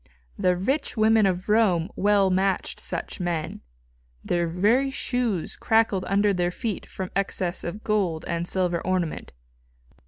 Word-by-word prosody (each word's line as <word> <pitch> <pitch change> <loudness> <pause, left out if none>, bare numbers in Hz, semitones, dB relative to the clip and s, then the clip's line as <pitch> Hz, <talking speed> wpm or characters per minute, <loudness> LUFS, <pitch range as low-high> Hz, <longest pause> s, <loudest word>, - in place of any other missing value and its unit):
The 180 -1 +1
rich 265 - -1
women 220 -1 +4
of 185 -1 -2
Rome 205 -6 +3
well 200 -1 +3
matched 190 0 0
such - - -5
men. 175 -3 -3 0.6
Their 175 -1 0
very 210 +11 +2
shoes 245 -9 -2
crackled 220 -4 +2
under 200 +1 +2
their 175 -1 0
feet 205 +2 -4
from 185 -1 -6
excess 190 -2 -1
of 195 +6 -6
gold 185 -7 0
and 170 0 -2
silver 180 -2 0
ornament. 180 -3 -2
190 Hz, 135 wpm, -25 LUFS, 175-215 Hz, 0.6 s, women